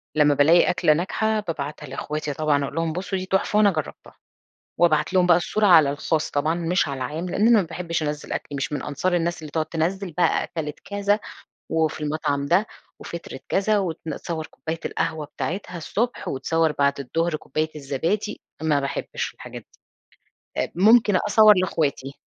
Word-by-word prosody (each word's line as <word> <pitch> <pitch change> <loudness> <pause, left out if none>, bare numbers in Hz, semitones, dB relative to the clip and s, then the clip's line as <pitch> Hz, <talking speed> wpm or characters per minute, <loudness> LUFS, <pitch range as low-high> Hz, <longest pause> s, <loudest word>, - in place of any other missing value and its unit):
لمّا 150 -1 +5
بالاقي 155 +5 +5
أكْلة 155 -3 +3
ناجحة 215 +6 0
بابعتها 155 -6 -5
لأخواتي 150 +2 -4
طبعًا، 145 -1 +1
أقول 140 - -5
لهم 165 -1 -1
بُصوا 190 +3 -3
دي 185 - -4
تُحفة 190 +2 0
وأنا 210 -1 +5
جرّبتها، 155 -4 -6 0.6
وأبعت 155 -1 +3
لهم 180 -1 +4
بقى 175 -2 +6
الصورة 210 +4 +1
على 160 -7 +7
الخاص 150 +2 -1
طبعًا 155 +3 0
مش 175 +1 0
على 140 -1 -4
العام؛ 155 +8 -4
لأن 210 - +2
أنا 235 -3 +6
ما 185 - -3
باحبش 170 0 -3
أنزّل 150 0 -4
أكْلي، 145 - -4
مش 140 +2 -3
من 145 - -2
أنصار 175 +6 -1
الناس 170 -1 -1
اللي 155 - -8
تقعد 155 +1 -1
تنزّل 175 +3 -2
بقى 175 +3 +2
أكَلِت 150 -3 -5
كذا 205 +1 0 0.5
وفي 160 -1 0
المطعم 145 -2 -1
ده 180 +8 +3 0.3
وفطرِت 170 -5 -8
كذا، 210 +2 +2
وتصوّر 165 -2 -4
كُوباية 160 +1 -6
القهوة 155 -2 -2
بتاعتها 180 +4 -5
الصبح 225 +9 -2
وتصوّر 160 +4 0
بعد 140 0 +2
الضهر 165 +5 -1
كُوباية 155 +1 -3
الزبادي، 165 +10 -2 0.2
ما 150 -3 +2
باحبش 140 0 -4
الحاجات - - -9
دي. - - -30 0.9
طب، - - -21
ممكن 210 +2 +5
أصور 215 +2 +6
لأخواتي. 150 -6 -1
165 Hz, 170 wpm, -23 LUFS, 150-185 Hz, 0.9 s, على